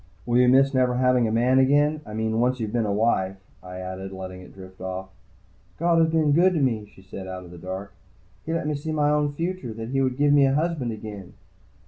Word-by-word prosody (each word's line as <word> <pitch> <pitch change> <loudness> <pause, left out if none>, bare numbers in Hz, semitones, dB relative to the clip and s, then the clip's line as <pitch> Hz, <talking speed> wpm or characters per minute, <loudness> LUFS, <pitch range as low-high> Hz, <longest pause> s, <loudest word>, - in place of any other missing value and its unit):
"Will 120 0 +2
you 125 - +5
miss 135 +2 +5
never 125 -1 +2
having 125 -2 +3
a - - -1
man 125 +3 +3
again? 145 +3 +3
I 105 - -7
mean, 110 0 -1
once 125 +1 +1
you've 110 -2 -4
been 115 -3 +1
a - - 0
wife 100 -3 +1 0.2
" 95 - -31
I 90 0 -8
added, 95 +1 -6
letting 95 -1 -8
it 90 - -13
drift 95 -1 -13
off. 95 0 -5 0.7
"God 170 0 +2
has 165 0 +4
been 160 -2 +2
good 180 +5 +4
to - - +1
me," 115 -7 0
she 95 - -18
said 95 0 -8
out 95 -1 -7
of 85 - -13
the 90 - -11
dark. 95 +3 -6 0.5
"He 160 - -5
let 165 -2 -1
me 150 - 0
see 150 +2 -4
my 150 -1 +2
own 150 -1 +1
future, 165 -6 -4
that 115 +1 -6
he 135 +1 0
would 130 -1 0
give 145 0 +3
me 140 -1 +5
a 135 - +1
husband 155 -6 -1
again." 105 -4 -8
125 Hz, 250 wpm, -24 LUFS, 95-145 Hz, 0.7 s, you